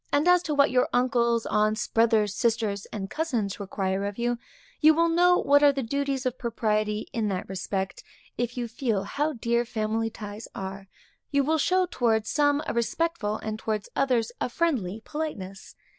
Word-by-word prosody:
As 350 +5 +4
to 305 -4 -2
what 280 0 +4
your 250 0 +2
uncles, 240 -2 +2
aunts, 215 +1 +1
brothers, 220 -3 +3
sisters, 220 -3 0
and 200 -3 -5
cousins 235 -9 -2
require 195 -1 -2
of 200 0 -4
you, 240 0 -1 0.4
you 310 0 +6
will 335 +1 +3
know 355 +2 +4
what 285 +1 +4
are 290 -1 +7
the 275 -1 -3
duties 275 +2 -2
of 255 0 -2
propriety 215 -2 -1
in 225 -3 0
that 190 -3 -3
respect, 190 +1 -3 0.3
if 240 +1 -3
you 240 -1 -2
feel 225 -4 -1
how 295 +9 -1
dear 235 -1 0
family 225 -1 -1
ties 210 0 -8
are; 195 0 -6 0.4
you 280 -1 +2
will 315 +3 +1
show 370 +4 +3
towards 225 -9 0
some 290 0 +2
a - - -2
respectful, 235 -2 -1
and 215 0 -4
towards 215 -2 -3
the - - 0
others 240 -4 +1
a - - 0
friendly 230 - -1
politeness. 205 -12 -6
235 Hz, 175 wpm, -26 LUFS, 210-280 Hz, 0.4 s, are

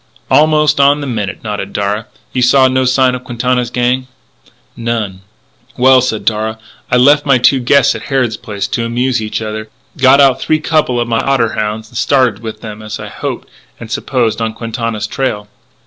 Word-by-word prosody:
"Almost 150 -1 +3
on 140 +1 +4
the 145 - -4
minute," 105 -6 -4
nodded 105 -2 -5
Darragh.... 105 +2 -2 0.3
"You 125 - 0
saw 130 +2 +5
no 130 0 +1
signs 130 0 +2
of 125 - -7
Quintana's 125 0 -1
gang?" 125 +1 0 0.7
"None." 115 -5 -3 0.6
"Well," 130 +1 +5
said 115 -4 -2
Darragh, 110 0 -1 0.3
"I 125 - +3
left 145 +4 +5
my 140 -3 +3
two 130 +2 +3
guests 130 +2 +3
at - - -7
Harrod 130 -5 0
Place 105 -4 -4
to 115 - -1
amuse 120 +1 0
each 110 +1 -3
other, 110 0 -5 0.3
got 135 0 +5
out 135 -2 +4
three 155 - +1
couple 155 -6 +1
of 120 - -1
my 115 -1 0
otter 130 -4 +1
hounds 110 +1 -3
and 120 - -9
started 125 -6 +2 0.2
them, 105 -1 -8
as 110 0 -6
I - - -7
hoped - - -5 0.3
and 115 -1 -9
supposed, 120 -2 -1
on 110 -1 -1
Quintana's 115 -2 -3
trail." 105 -3 -3
120 Hz, 180 wpm, -14 LUFS, 110-130 Hz, 0.7 s, saw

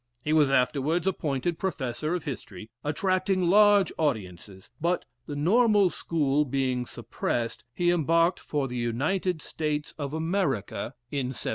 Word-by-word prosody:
He 150 - 0
was 150 -3 +5
afterwards 140 +6 +1
appointed 165 -3 -1
Professor 155 -3 -2
of 175 - -4
History, 110 -6 -7
attracting 185 +5 +1
large 205 +1 +5
audiences; 95 - -3
but 175 +2 0 0.2
the 145 - -4
Normal 205 +4 +4
School 150 -3 +1
being 130 -3 -1
suppressed, 115 -1 -3
he 175 +7 +1
embarked 165 +1 +2
for 145 -3 -2
the 125 -1 -5
United 155 +9 -1
States 150 -1 -3
of 145 +1 -3
America, 150 - -1 0.2
in 140 -3 -1
1795. 130 - -4
150 Hz, 135 wpm, -27 LUFS, 130-175 Hz, 0.2 s, was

